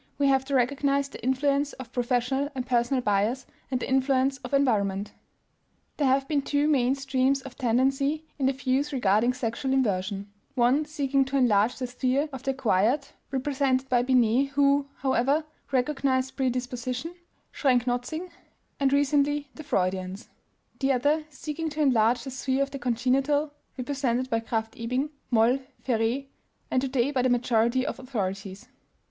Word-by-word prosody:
We 280 -1 +3
have 265 -1 +2
to 280 0 -1
recognize 275 +2 +1
the - - -11
influence 280 +3 +1
of 255 -2 -10
professional 250 +2 0
and 255 -1 -3
personal 245 +1 +1
bias 210 +6 +1 0.2
and 255 -2 -1
the - - -4
influence 265 0 +2
of 250 - -8
environment. 210 -8 +1 0.9
There 285 - +2
have 270 +1 +2
been 290 -1 +1
two 285 +1 +1
main 265 -3 +3
streams 270 0 0
of 265 -3 -10
tendency 270 +5 +1
in 265 - +2
the - - +3
views 265 +2 0
regarding 240 -1 +2
sexual 250 +2 -2
inversion: 200 -5 -1 0.2
one 255 +4 +3
seeking 280 -3 +1
to 275 +1 -1
enlarge 225 -3 +3
the 255 - -3
sphere 255 +4 0
of 265 - -6
the 270 - -3
acquired 265 +2 +1 0.2
(represented 270 -1 0
by 245 -1 +3
Binet, 250 +1 +3
who, 280 0 +3
however, 270 +3 +1 0.3
recognized 265 0 0
predisposition, 250 +3 -2 0.4
Schrenck 255 -4 +2
Notzing, 285 +9 -3 0.5
and 275 -1 +2
recently 285 0 +2
the 310 - -9
Freudians), 185 -5 -2 0.5
the 270 -1 +2
other 290 +5 +1
seeking 310 +2 -4
to 300 +1 -7
enlarge 240 -4 +3
the 265 - -6
sphere 265 +1 0
of 275 - -5
the 275 - -6
congenital 265 +5 +1 0.2
(represented 255 -1 -1
by 230 - +2
Krafft 225 0 -4
Ebing, 255 +6 -1 0.2
Moll, 240 +2 +3 0.3
Féré, 240 +2 0 0.5
and 255 - +2
today 265 0 0
by 265 -3 +1
the 255 - +2
majority 245 +1 +2
of - - -4
authorities). 200 -3 -4
260 Hz, 155 wpm, -27 LUFS, 245-275 Hz, 0.9 s, We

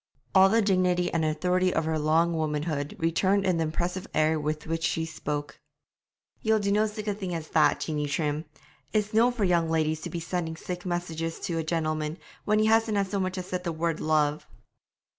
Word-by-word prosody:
All 190 0 +7
the 225 +2 +3
dignity 180 -3 +2
and 165 -1 +1
authority 180 +4 +1
of 165 - 0
her 160 -1 0
long 160 +3 +2
womanhood 150 -2 -2
returned 190 +4 +2
in 185 -3 +2
the 165 - +1
impressive 180 +4 -3
air 155 0 +3
with 150 0 -3
which 165 0 -2
she 160 0 0
spoke. 145 -3 -5 0.8
'Ye'll 220 0 +3
no 205 +1 +2
do - - -7
sic 215 0 -7
a 205 - +1
thing 190 -4 -4
as 160 -2 -6
that, 155 -2 +3
Jeanie 150 -2 -2
Trim! 150 +1 -1 0.5
It's 210 -1 0
no 230 +3 +5
for 240 -4 -2
young 170 -3 +2
ladies 155 -1 0
to - - -5
be 170 - -4
sending 165 -1 -3
sic 180 +2 -6
messages 165 -2 -3
to 165 -2 -2
a - - -1
gentleman, 155 -1 -1 0.3
when 210 0 +3
he 215 - +3
hasna 220 -2 +3
so 195 +1 -2
much 185 0 -2
as 185 - -4
said 180 0 -4
the 170 - -2
word 165 0 -1
"love."' 155 -1 +1
170 Hz, 200 wpm, -27 LUFS, 155-190 Hz, 0.8 s, All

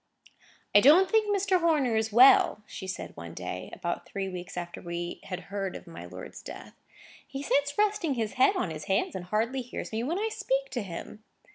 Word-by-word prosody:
"I 205 - +9
don't 320 - +6
think 440 -1 +3
Mr. 395 -2 +2
Horner 300 -8 +2
is 220 0 0
well," 235 -2 +6
she 190 - -8
said 190 - -6
one - - -9
day; - - -5
about - - -4
three 195 -1 -3
weeks 180 0 -7
after 175 -1 -5
we 175 0 -5
had 185 -1 -5
heard 195 -2 -3
of - - -9
my 85 +1 -9
lord's 90 - -9
death. - - -10 0.5
"He 275 +1 -6
sits 285 0 +1
resting 415 -8 +1
his 220 -3 -2
head 265 +10 +4
on 185 - -1
his 155 -1 -6
hand, 195 +3 +1
and 180 -1 -5
hardly 225 +7 0
hears 245 - -6
me 220 0 -1
when 305 +9 -1
I 440 +2 0
speak 275 -11 -1
to 250 -2 -2
him." 200 +3 -8
235 Hz, 205 wpm, -28 LUFS, 190-310 Hz, 0.5 s, I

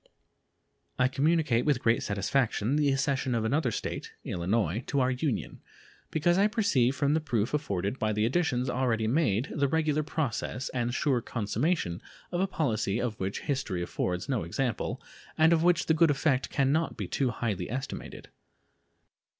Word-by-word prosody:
I 125 - +4
communicate 140 -3 +2
with 145 -5 +2
great 115 0 +3
satisfaction 110 +4 0
the 145 -2 +3
accession 135 -2 0
of 110 -1 0
another 135 +3 +1
State - - -4
(Illinois) 95 +4 -1
to 140 - 0
our 130 0 +2
Union, 130 0 -2 0.5
because 175 +4 +2
I 205 - +5
perceive 200 - +2
from 140 0 +1
the 160 - +3
proof 120 -5 -1
afforded 100 -6 -1
by 110 -1 +1
the 105 +1 +1
additions 130 -2 +1
already 125 -3 0
made 120 -2 +1
the 140 -2 +1
regular 155 0 +1
progress 135 -4 -3
and 120 -1 -1
sure 130 -1 +1
consummation 115 - -1 0.3
of 175 0 0
a 195 - +2
policy 110 - -1
of 120 -4 -3
which 95 +1 -3
history 130 -11 -2
affords 90 +1 -2
no 130 -6 0
example, 120 +9 -2 0.4
and 160 +1 +5
of 165 - +3
which 175 +1 +3
the 160 - +3
good 160 0 +4
effect 135 -2 +1
can 135 -2 +1
not 160 +2 0
be - - -4
too 135 -3 0
highly 110 -6 -3
estimated. 135 +4 -6
130 Hz, 165 wpm, -29 LUFS, 110-150 Hz, 0.5 s, I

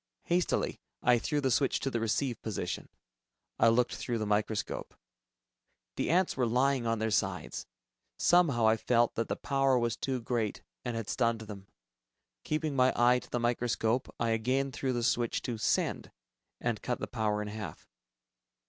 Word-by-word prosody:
Hastily, 175 +1 0 0.2
I 125 -1 +5
threw 150 +4 -1
the 135 -2 +1
switch 135 +2 +2
to 135 - -1
the 120 - 0
"receive" 115 +3 -1
position. 110 -4 -4 0.7
I - - +6
looked 120 +2 +3
through 120 -2 -2
the 110 - -2
microscope. 105 +1 -1 1.0
The - - -1
ants 180 +2 +2
were 125 -3 +1
lying 125 +1 +2
on 115 0 +1
their 110 0 -1
sides. - - -1 0.5
Somehow, 155 -10 +4
I 110 0 +4
felt 120 +1 +2
that 115 - -2
the - - -1
power 135 -2 +2
was 120 -2 0
too 130 -2 -2
great, 115 -3 -2 0.2
and 120 - -3
had 115 -2 -4
stunned 115 -3 +1
them. 100 -3 -9 0.8
Keeping 155 -1 -1
my 130 0 +4
eye 125 +1 +5
to - - -15
the 120 - -1
microscope, 120 0 0
I 115 -1 +1
again 130 +5 +1
threw 130 0 -2
the 120 -1 -1
switch 120 0 +1
to 120 -3 -3
"send," - - 0 0.5
and - - -2
cut - - -2
the - - -2
power 105 -1 -1
to 105 - -6
half. 105 -1 -7
120 Hz, 170 wpm, -31 LUFS, 110-130 Hz, 1.0 s, I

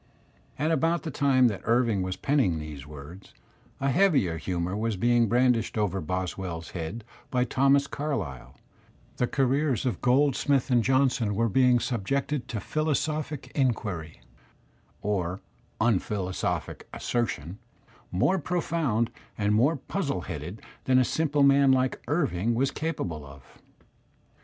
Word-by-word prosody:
At 155 +2 0
about 165 +2 +1
the 160 - -4
time 130 -2 +4
that 105 - -5
Irving 115 -3 +2
was 95 0 -2
penning 135 - +1
these 75 -2 -7
words, 75 +6 -11 0.4
a 135 0 +1
heavier 135 - +3
humour 90 +2 -2
'was 110 -1 -1
being 120 +3 +3
brandished 120 -1 +2
over 100 -2 0
Boswell's 90 -1 -4
head 90 +7 -5 0.3
by 125 -1 +1
Thomas 135 +3 +3
Carlyle; 135 - -4 0.6
the 125 - +1
careers 135 0 +1
of 120 -8 -1
Goldsmith 135 +1 +2
and 120 -2 +4
Johnson 130 -4 +2
were 115 +2 +1
being 125 +2 +4
subjected 130 +4 -2
to 115 -6 -4
philosophic 155 +1 -2
inquiry 105 - -2 0.8
(or 95 -3 -1 0.4
unphilo 100 -4 0
sophic - - -3
assertion) 100 - -3 0.5
more 185 - +2
profound 160 -9 0 0.3
and 105 0 +1
more 130 +10 +3
puzzle 145 +1 -3
headed 85 +5 -7 0.2
than 130 -1 +4
a 130 - +5
simple 145 +2 +1
man 140 0 +6
like 130 0 +1
Irving 120 - 0
was 135 +3 +1
capable 90 - -3
of. 70 -2 -13
120 Hz, 130 wpm, -27 LUFS, 95-140 Hz, 0.8 s, man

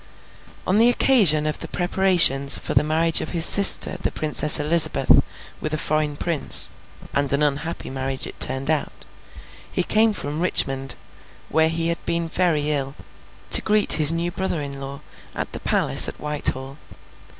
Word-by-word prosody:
On 190 +3 -1
the 235 +2 +4
occasion 205 - +1
of 155 - -5
the - - -8
preparations 175 -7 +2
for - - -7
the - - +1
marriage 160 +2 +1
of - - -7
his 165 - +6
sister 200 -2 +4
the - - -4
Princess 150 -1 -1
Elizabeth 155 +2 +2 0.4
with 155 0 -4
a - - -5
foreign 155 -1 -3
prince 165 -3 +6 0.4
(and 140 -1 -1
an 140 +2 +1
unhappy 150 +3 -5
marriage 135 0 -5
it - - -12
turned 135 +3 0
out), 155 -2 -6 0.7
he 180 - -2
came 220 +4 0
from 150 -6 -7
Richmond, 135 -7 -1 0.5
where 160 0 0
he 165 +1 -2
had 170 - -5
been 170 0 -4
very 160 -3 -2
ill, 140 -1 -5 0.6
to - - +5
greet 210 -1 +2
his 155 -1 +5
new 170 +1 -5
brother 185 -2 -5
in 140 -1 -9
law, 135 0 -10 0.3
at - - -7
the - - -7
palace - - 0
at - - -14
Whitehall. 140 -2 -1
155 Hz, 165 wpm, -19 LUFS, 140-170 Hz, 0.7 s, his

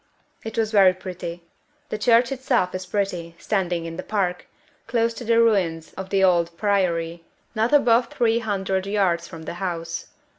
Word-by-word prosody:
It 225 0 -7
was 220 -1 +1
very 195 -4 +6
pretty. 180 -2 -7 0.5
The - - -2
church 235 +3 +4
itself 260 -9 0
is 185 0 -5
pretty, 180 -4 -2
standing 180 -4 -1
in 165 0 -6
the - - -3
park, 185 -3 -2 0.4
close 230 0 +1
to 240 - -8
the 230 0 +3
ruins 180 -8 +1
of 190 0 -7
the 195 -1 +2
old 170 -2 +2
Priory, 170 -5 0 0.3
not 225 +1 +1
above 245 -4 +4
three 230 -1 +1
hundred 195 -3 -2
yards 185 -5 +1
from 165 -2 -10
the - - -5
house. 170 -3 -4
190 Hz, 170 wpm, -23 LUFS, 175-225 Hz, 0.5 s, very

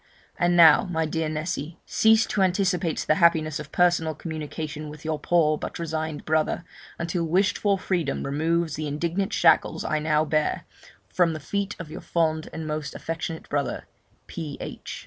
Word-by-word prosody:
'And 175 0 +3
now, 170 +3 +8
my 160 -3 -1
dear 160 0 -2
Nessy, 155 0 -4
cease 220 0 +4
to 200 - -1
anticipate 185 -2 +1
the - - +5
happiness 160 -2 +3
of 150 -1 -8
personal 170 -3 +2
communication 155 -1 -6
with 150 +1 -11
your 155 -1 -1
poor, 155 -1 +2
but - - -5
resigned 160 -2 -4
brother, 155 +2 0 0.3
until 170 0 -2
wished 185 +4 +1
for 200 -2 +2
freedom 175 -6 -1
removes 160 +4 0
the 155 -1 -3
indignant 170 +7 -1
shackles - - +3
I 155 - 0
now 155 0 +2
bear, 155 0 0 0.4
from 175 -3 +2
the 155 - -5
feet 200 +6 -3
of 160 -3 -8
your - - -7
fond 160 -2 0
and 160 -1 -6
most 155 -1 -4
affectionate 165 0 -5
brother, 145 -1 -2 0.4
P.H.' 155 -4 -7
160 Hz, 165 wpm, -25 LUFS, 155-175 Hz, 0.4 s, now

